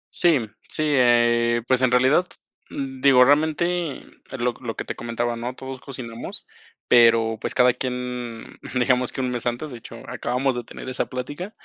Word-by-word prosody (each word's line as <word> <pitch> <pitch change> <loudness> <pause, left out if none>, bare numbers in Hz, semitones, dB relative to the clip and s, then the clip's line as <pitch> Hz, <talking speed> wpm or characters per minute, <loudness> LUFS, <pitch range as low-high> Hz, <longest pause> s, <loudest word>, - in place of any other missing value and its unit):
Sí, 150 -11 +3 0.2
sí, 155 - -2
eh, 120 -2 +3
pues, 130 -1 +2
en 130 - +4
realidad, 130 +8 +3 0.4
digo, 135 -1 +3
realmente, 160 +3 +1 0.4
lo 125 0 0
lo 115 -2 -5
que - - -5
te - - -5
comentaba, 120 0 -2
¿no?, 120 +2 -5
todos 130 0 -8
cocinamos, 120 -4 -8 0.4
pero, 115 -2 +5
pues, - - -3
cada 125 -1 +5
quien, 125 -2 -4 0.3
digamos 125 0 +2
que 130 - -4
un 125 -1 -1
mes 120 0 -3
antes, 125 +5 -3
de 120 - -8
hecho, - - -11
acabamos 130 +2 -1
de 120 - -4
tener 130 - -10
esa 130 - -2
plática, 145 +10 -6
125 Hz, 165 wpm, -23 LUFS, 120-135 Hz, 0.4 s, pero